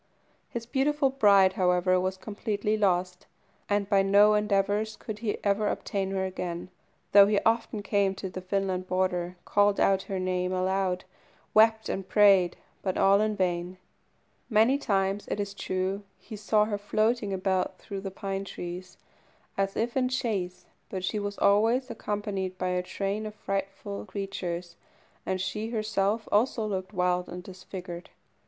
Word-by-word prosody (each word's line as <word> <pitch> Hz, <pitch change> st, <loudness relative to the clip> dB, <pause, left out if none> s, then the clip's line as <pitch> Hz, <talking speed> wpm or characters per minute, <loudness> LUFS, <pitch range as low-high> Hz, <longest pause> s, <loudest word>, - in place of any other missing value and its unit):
His 230 Hz, -1 st, -5 dB
beautiful 275 Hz, +2 st, +1 dB
bride, 200 Hz, -7 st, +5 dB
however, 185 Hz, 0 st, +2 dB
was 185 Hz, +1 st, -1 dB
completely 210 Hz, +1 st, -2 dB
lost; 180 Hz, -3 st, 0 dB, 0.4 s
and 205 Hz, -1 st, +1 dB
by 195 Hz, -1 st, +4 dB
no 200 Hz, +2 st, +5 dB
endeavours 210 Hz, +1 st, +1 dB
could 215 Hz, -2 st, -7 dB
he 220 Hz, -2 st, -2 dB
ever 205 Hz, +1 st, +2 dB
obtain 195 Hz, -2 st, -2 dB
her 190 Hz, -1 st, -1 dB
again, 180 Hz, -1 st, -5 dB, 0.4 s
though 200 Hz, 0 st, +8 dB
he 205 Hz, -1 st, +3 dB
often 225 Hz, -2 st, 0 dB
came 200 Hz, -1 st, +1 dB
to 190 Hz, 0 st, -5 dB
the 185 Hz, 0 st, -7 dB
Finland 185 Hz, -1 st, -1 dB
border, 180 Hz, -1 st, 0 dB
called 205 Hz, 0 st, +3 dB
out 195 Hz, -1 st, +3 dB
her 195 Hz, -, -2 dB
name 185 Hz, 0 st, -1 dB
aloud, 185 Hz, 0 st, 0 dB, 0.5 s
wept 220 Hz, 0 st, +5 dB
and 190 Hz, -1 st, -4 dB
prayed, 195 Hz, -4 st, +5 dB, 0.2 s
but 185 Hz, -2 st, -2 dB
all 200 Hz, +1 st, +5 dB
in 215 Hz, 0 st, 0 dB
vain. 180 Hz, -1 st, -1 dB, 0.7 s
Many 230 Hz, +5 st, +4 dB
times, 195 Hz, -4 st, 0 dB
it -, -, -3 dB
is 200 Hz, -1 st, -3 dB
true, 190 Hz, 0 st, -2 dB, 0.2 s
he 220 Hz, -, -10 dB
saw 210 Hz, 0 st, +2 dB
her 205 Hz, -1 st, -3 dB
floating 215 Hz, +1 st, 0 dB
about 190 Hz, -1 st, 0 dB
through 200 Hz, -2 st, -7 dB
the 195 Hz, -, -4 dB
pine 195 Hz, 0 st, -4 dB
trees, 180 Hz, -1 st, -7 dB, 0.6 s
as 195 Hz, 0 st, -1 dB
if 235 Hz, +2 st, -1 dB
in 255 Hz, -1 st, +2 dB
chase, 190 Hz, -8 st, -2 dB, 0.2 s
but 185 Hz, -2 st, -4 dB
she 210 Hz, +3 st, -1 dB
was 205 Hz, 0 st, -4 dB
always 230 Hz, +5 st, +3 dB
accompanied 205 Hz, -4 st, -3 dB
by 185 Hz, 0 st, -1 dB
a 180 Hz, 0 st, 0 dB
train 200 Hz, +3 st, -3 dB
of 210 Hz, -, -9 dB
frightful 195 Hz, 0 st, -4 dB
creatures, 180 Hz, -3 st, -5 dB, 0.5 s
and 190 Hz, 0 st, 0 dB
she 210 Hz, +4 st, -3 dB
herself 215 Hz, -1 st, 0 dB
also 225 Hz, +1 st, +2 dB
looked 190 Hz, -2 st, -3 dB
wild 180 Hz, -2 st, 0 dB
and 180 Hz, +1 st, -7 dB
disfigured. 180 Hz, -1 st, -8 dB
195 Hz, 155 wpm, -28 LUFS, 185-210 Hz, 0.7 s, though